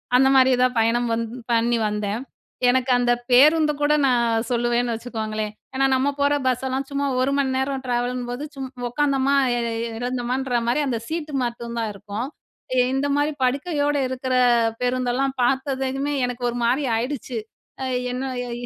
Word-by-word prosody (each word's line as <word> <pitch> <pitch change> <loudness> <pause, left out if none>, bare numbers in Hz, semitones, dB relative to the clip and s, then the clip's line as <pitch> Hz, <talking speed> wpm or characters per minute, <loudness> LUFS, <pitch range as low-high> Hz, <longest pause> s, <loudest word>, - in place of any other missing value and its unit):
அந்த 265 +1 +6
மாரி 260 0 +6
தான் 255 0 +1
பயணம் 235 +2 +2
வந்து 230 +1 -3 0.2
பண்ணி 235 +1 +2
வந்தேன். 210 +1 -2 0.5
எனக்கு 255 +1 +2
அந்த 245 0 +2 0.2
பேருந்து 300 +4 +6
கூட 290 +1 +3
நான் 235 -2 +2
சொல்லுவேன்னு 240 0 +1
வச்சுக்கோங்களேன், 220 -2 -4 0.2
ஏன்னா 270 +1 +2
நம்ம 260 +2 +1
போற 285 +1 +3
பஸ்ஸெல்லாம், 260 +2 -1
சும்மா 280 0 -1 0.2
1 265 +2 +1
மணி 265 -2 +1
நேரம் 265 0 -2
ட்ராவலும்போது. 245 +1 -2
சும் 265 -1 -5 0.2
உக்காந்தோமா, 275 +1 +1 0.2
எ - - 0 0.4
இறந்தோமன்ற 250 +1 -1
மாரி 245 +5 +2
அந்த 240 -3 -1
சீட்டு 315 -2 -4
மட்டும் 235 0 -5
தான் 225 -1 -1
இருக்கும். 205 +4 -5 0.7
இந்த 270 +2 0
மாரி 290 +1 +1
படுக்கையோட 290 +2 0
இருக்குற 260 0 -3 0.5
பேருந்தெல்லாம் 255 +2 0
பாத்ததுமே, 270 +2 0
எனக்கு 245 0 -6
ஒரு 240 - -5
மாரி 260 +5 +1
ஆயிடுச்சு, 250 0 -3 0.4
அ - - -1 0.3
என்ன 250 +1 -3 0.2
எ? - - -6
255 Hz, 150 wpm, -23 LUFS, 240-270 Hz, 0.7 s, அந்த